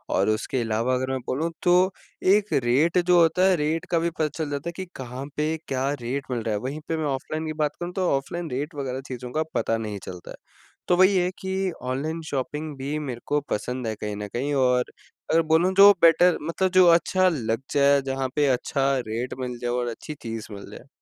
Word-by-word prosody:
और 100 +3 +2
उसके 115 +3 -1
अलावा 115 +3 0
अगर 130 +1 -2
मैं 130 - -1
बोलूँ 160 +6 -1
तो 180 +2 +4 0.4
एक 210 0 +1
रेट 145 +9 +2
जो 175 0 +4
होता 170 +3 +3
है, 185 - +4
रेट 160 +2 -1
का 170 - +3
भी 170 - 0
पता 160 -2 -1
चल 155 -2 -2
जाता 145 +3 -3
है - - -4
कि 190 0 -5
कहाँ 130 +1 -6
पे 155 +1 0
क्या 135 0 -1
रेट 130 +4 -3
मिल 120 -2 -1
रहा 110 - -1
है? - - -1
वहीं 140 +4 -4
पे 160 - -1
मैं 155 - -2
ऑफ़लाइन 145 +3 -3
की 155 - -3
बात 150 - -1
करूँ, 175 0 -4
तो 185 -2 0
ऑफ़लाइन 165 +4 -5
रेट 145 +5 -3
वगैरह 135 -2 -3
चीज़ों 125 -1 -6
का 155 +3 0
पता 115 - 0
नहीं 105 -3 -5
चलता 90 -1 -9
है। - - -8 0.5
तो 180 - +4
वही 190 +2 +5
है 180 0 +2
कि 190 0 -2
ऑनलाइन 145 +6 -3
शॉपिंग 150 +2 -4
भी 140 +3 -3
मेरे 125 -5 -5
को 145 - +2
पसंद 125 +2 -3
है 110 - -1
कहीं 105 -1 -3
न 105 0 -5
कहीं 140 +4 -1
और 125 -2 +3 0.5
अगर 165 +1 +5
बोलूँ 170 +4 +3
जो 200 +1 +10
बेटर 170 +1 +6
मतलब 170 +4 0
जो 185 -1 +6
अच्छा 185 +2 +4
लग 115 -6 -2
जाए, 140 -1 +4
जहाँ 135 0 -2
पे 145 -1 +3
अच्छा 135 +1 +1 0.2
रेट 115 +3 -3
मिल 125 -1 -4
जाए 120 - -1
और 120 0 -1
अच्छी 120 +6 -7
चीज़ 115 -2 -5
मिल 100 0 -10
जाए। 120 +5 -12
140 Hz, 225 wpm, -25 LUFS, 125-165 Hz, 0.5 s, जो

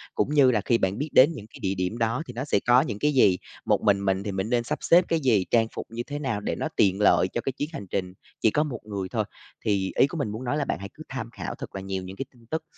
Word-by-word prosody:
cũng 150 - 0
như 140 -4 +6
là 110 -4 +1
khi 120 - +3
bạn 95 -1 0
biết 150 +4 -3
đến 140 +6 +7
những 105 -8 -9
cái - - -14
địa 95 0 -1
điểm 90 +4 -2
đó 115 +6 0
thì - - -7
nó 125 +3 -4
sẽ 135 - +2
có 125 +2 +7
những 105 -3 -4
cái 150 +4 +2
gì, 100 -9 +5 0.3
một - - +2
mình 100 -1 +3
mình 95 0 +1
thì 100 - -3
mình 95 +3 -2
nên 120 -1 +2
sắp 150 +5 -2
xếp 175 +1 +5
cái 165 - +2
gì, 115 -10 +2
trang 115 -1 +4
phục - - -5
như 115 +1 -4
thế 145 +3 -5
nào 125 -8 -2
để - - -2
nó - - -2
tiện 95 0 +3
lợi 100 - +5
cho 120 - -3
cái 135 - -2
chuyến 145 +3 -4
hành 100 - -6
trình 90 -1 -3 0.3
chỉ 110 - +4
có 150 - +2
một 130 -7 -5
người 100 -3 -4
thôi. - - 0 0.4
Thì 100 -2 +1
ý - - +5
của 165 - -6
mình 140 -8 -1
muốn 110 +4 -6
nói 125 +4 -1
là 145 - 0
bạn - - -2
hãy 100 +1 -7
cứ - - -11
tham - - -5
khảo - - -6
thật - - -9
là 95 - -4
nhiều 95 -1 -4
những 95 +1 -8
cái 135 - -3
tin 120 -2 -21
tức, 160 0 -1
115 Hz, 315 wpm, -26 LUFS, 100-135 Hz, 0.4 s, đến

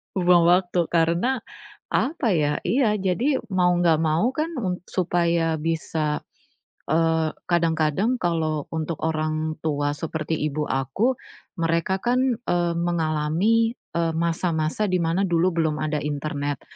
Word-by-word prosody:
Buang 175 -2 +4
waktu 175 -1 +3
karena, 175 +10 +1 0.4
apa 260 - 0
ya? 150 -2 +1
ya, 225 -5 +2
jadi 215 +9 +1
mau 185 -4 +2
enggak 170 -3 +3
mau 165 +11 +1
kan 315 +2 -1
m 180 -6 -2
supaya 170 -3 0
bisa, 155 -1 -1 0.7
eee, 160 0 +1 0.2
kadang-kadang 170 - +1
kalau 160 -4 -1
untuk 160 0 -4
orang 155 0 -1
tua 145 -1 0
seperti 160 0 -3
ibu 150 0 -2
aku, 195 - 0 0.4
mereka 165 +2 0
kan, 245 +3 +1
eee, 175 -1 +1
mengalami, 170 +7 +1 0.2
eee, 165 -1 +1
masa-masa 165 +2 0
di 185 -3 0
mana 170 +4 +1
dulu 175 0 +2
belum 160 -3 -1
ada 155 0 -1
internet. 145 -1 -3
165 Hz, 125 wpm, -24 LUFS, 155-185 Hz, 0.7 s, Buang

